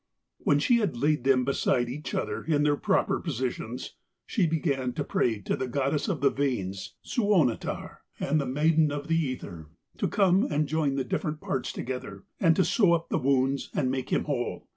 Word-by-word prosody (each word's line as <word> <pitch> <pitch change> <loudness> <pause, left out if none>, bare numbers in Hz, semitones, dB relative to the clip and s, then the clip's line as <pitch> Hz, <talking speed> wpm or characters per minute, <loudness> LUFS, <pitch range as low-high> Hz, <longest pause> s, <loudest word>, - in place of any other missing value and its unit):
When 145 - +3
she 235 +11 +3
had 205 - -1
laid 145 0 +1
them 130 -2 +4
beside 125 -2 +1
each 145 +5 -5
other, - - -2
in 150 -3 +1
their 145 -1 +3
proper 190 +6 +1
positions, 125 -4 -4 0.3
she 190 -7 +1
began 140 -6 -1
to - - -2
pray 115 -3 0
to - - -1
the 130 - -3
goddess 140 - 0
of 175 -10 -2
the 140 - +4
veins, 100 -9 -2
Suonetar, 195 - 0 0.2
and 150 +2 +1
the 140 - -3
maiden 155 +3 +3
of 145 0 -4
the 165 - +2
ether, 90 - -5 0.3
to - - +1
come 195 -1 +3
and 150 0 +1
join 150 -2 0
the 135 - 0
different 150 +2 -2
parts 130 - -2
together, 125 -6 -6 0.2
and 165 -3 +4
to 185 - +3
sew 195 -7 +4
up 165 -1 -1
the - - +1
wounds 135 0 +1
and 130 -4 +1
make 130 -1 -3
him - - +1
whole. 130 -5 -3
140 Hz, 190 wpm, -27 LUFS, 130-160 Hz, 0.3 s, them